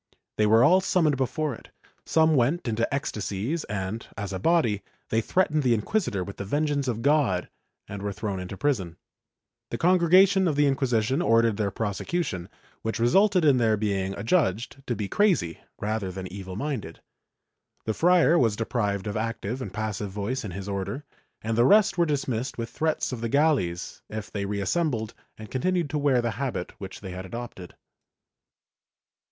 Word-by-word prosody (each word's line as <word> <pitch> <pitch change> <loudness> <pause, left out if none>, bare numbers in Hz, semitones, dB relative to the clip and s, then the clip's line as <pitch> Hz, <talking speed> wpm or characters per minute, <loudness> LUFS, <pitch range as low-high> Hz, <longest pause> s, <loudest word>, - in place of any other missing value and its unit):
They 105 - +3
were 110 +3 +6
all 180 +8 +6
summoned 165 -6 +2
before 140 +3 -1
it; - - -12 0.4
some 160 0 +4
went 135 +5 +1
into 115 0 0
ecstasies 125 - -2
and, 100 +2 -4
as 100 -2 -4
a 95 - -3
body, 115 - +2 0.3
they 115 - +2
threatened 155 +3 +1
the 125 -4 +3
inquisitor 105 - -1
with 100 +2 -8
the - - -4
vengeance 145 +5 0
of 115 -2 -2
God 140 -11 +2 0.4
and 100 -1 -7
were 100 0 -2
thrown 100 -1 -4
into 90 +1 -6
prison. 95 - -1 0.7
The - - -3
Congregation 185 +2 +5
of 155 - +1
the 145 0 +4
Inquisition 135 0 +1
ordered 115 - +3
their 105 -2 0
prosecution, 100 - -3 0.3
which 110 +1 -2
resulted 180 - +4
in 140 -3 +5
their 110 -3 +3
being 100 -2 -1
adjudged 120 - 0
to 120 - 0
be 105 -2 -3
crazy 170 - +1 0.2
rather 105 -2 -2
than 95 0 -6
evil 95 -2 -7
minded. 115 - -4 0.9
The 110 - 0
friar 170 +2 +4
was 115 -4 +2
deprived 105 -3 -1
of 105 - -3
active 115 +2 -3
and 105 - -5
passive 105 0 -3
voice 105 +7 -3
in 105 - -5
his 95 +2 -6
Order 100 +8 -3 0.4
and 110 0 -1
the 120 - +4
rest 200 - +5
were 170 - +4
dismissed 135 -4 -2
with 115 -1 -4
threats 155 -3 -1
of 125 -3 -5
the 115 - -2
galleys 135 - +1
if 110 -1 -6
they 100 -1 -3
reassembled 110 - -1 0.2
and 110 -1 -10
continued 170 +4 0
to 150 - 0
wear 135 -4 +2
the 120 - 0
habit 125 -10 -3
which 95 -1 -8
they 95 -2 -7
had 90 +1 -6
adopted. 115 -5 -8
115 Hz, 170 wpm, -26 LUFS, 100-150 Hz, 0.9 s, were